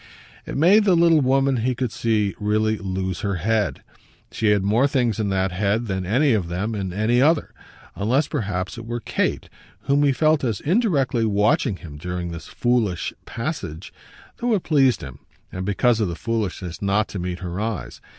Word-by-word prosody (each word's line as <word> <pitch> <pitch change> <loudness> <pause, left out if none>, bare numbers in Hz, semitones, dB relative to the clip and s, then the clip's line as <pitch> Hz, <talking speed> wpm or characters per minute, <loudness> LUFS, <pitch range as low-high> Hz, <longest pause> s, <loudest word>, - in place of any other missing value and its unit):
It - - -4
made 190 +8 +5
the 190 -3 +5
little 165 -2 +5
woman, 135 0 +2
he 125 +2 0
could 125 -2 -2
see, 105 -4 0
really 110 +1 +1
lose 95 -1 -3
her 100 -1 -1
head. 105 +4 -1 0.5
She 110 - -1
had 105 -2 +3
more 110 +7 +3
things 120 -5 0
in 105 -2 0
that 95 -1 0
head 100 +5 0
than 95 -3 -3
any 130 +6 +3
of 100 -6 0
them 95 +6 -2
in 95 -3 -3
any 110 +6 +2
other; 155 +2 +2 0.4
unless 120 +9 +1
perhaps 100 - -3
it 115 - -9
were 120 +1 -3
Kate, - - -2 0.3
whom 140 +1 +2
he 145 -1 +4
felt 155 +3 +2
as 115 -6 -1
indirectly 150 - +1
watching 105 +1 +2
him 75 -5 -10
during 90 +2 -4
this 85 0 -8
foolish 120 -7 0
passage, 110 - -5 0.4
though 240 -2 +1
it 190 - -2
pleased 135 -5 +3
him 70 -2 -9 0.3
and 95 +1 -5
because 115 +3 +2
of 105 - +1
the 85 - -4
foolishness 100 -5 -3
not 100 +2 +1
to 100 - -5
meet 90 0 -3
her 90 0 -4
eyes. 110 -4 -4
110 Hz, 185 wpm, -22 LUFS, 95-130 Hz, 0.5 s, made